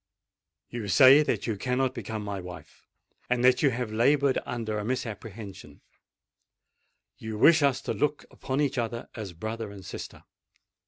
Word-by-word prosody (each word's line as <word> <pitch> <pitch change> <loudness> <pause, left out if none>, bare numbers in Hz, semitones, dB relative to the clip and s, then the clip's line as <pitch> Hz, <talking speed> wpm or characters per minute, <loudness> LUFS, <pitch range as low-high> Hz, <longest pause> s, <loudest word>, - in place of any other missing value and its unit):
You 120 -3 -5
say 130 +9 +7
that 150 - -1
you 115 - -1
cannot 125 +5 -1
become 110 -1 -5
my 100 -1 -4
wife—and 120 +6 -6
that 130 0 +5
you 140 - +4
have 120 -3 -3
laboured 140 +4 +3
under 110 -3 -3
a - - -4
misapprehension: 110 -4 -6 1.4
you 110 -1 -5
wish 160 +8 +6
us 140 -2 +2
to - - -2
look 150 0 -1
upon 135 +2 -3
each 140 -2 0
other 115 0 -4
as 105 -5 -7
brother 110 +5 -5
and 100 -2 -11
sister. - - -8
115 Hz, 150 wpm, -27 LUFS, 105-130 Hz, 1.4 s, say